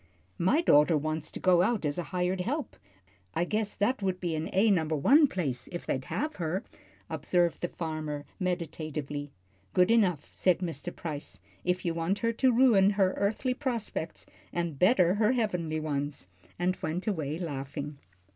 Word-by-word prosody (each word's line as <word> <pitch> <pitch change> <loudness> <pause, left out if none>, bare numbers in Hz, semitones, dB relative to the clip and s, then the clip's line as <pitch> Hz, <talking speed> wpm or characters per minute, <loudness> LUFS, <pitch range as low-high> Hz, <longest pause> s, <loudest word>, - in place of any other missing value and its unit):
"My 245 - +3
daughter 150 - +5
wants 155 +1 -2
to - - -7
go 180 -2 +4
out 210 -1 +1
as 145 -1 -1
hired 180 +2 -1
help. 280 - -3 0.6
I 175 - +1
guess 210 +2 -1
that 235 +4 +1
would 190 -2 -1
be 170 -3 -2
an 155 +1 -3
A 205 +3 +4
number 160 -4 +1
one 285 - +6
place, 135 - -2
if 175 - -5
they'd 130 -1 -2
have 305 +1 -3
her," 175 +2 -2 0.4
observed 175 -2 0
the 175 - 0
father, 155 -4 -4
meditatively. 155 -5 -3 0.5
"Good 180 +3 +5
enough," 185 -10 +2
said 180 -2 +3
Mr. 175 -1 -5
Price, 150 -4 -5 0.2
"if 180 +1 0
you 170 - +1
want 165 +4 0
her 230 - +3
to 255 +3 +3
ruin 230 -6 +5
her 190 -2 +3
earthly 220 +6 0
prospects, 235 - -3 0.3
and 170 -5 -3
better 180 -3 +5
her 210 +4 +3
heavenly 180 -10 -1
ones," 145 -7 -3 0.3
and 180 +1 +1
he - - -25
went 160 +4 -2
away 160 -8 -1
laughing. 145 -3 -5
175 Hz, 165 wpm, -29 LUFS, 155-200 Hz, 0.6 s, one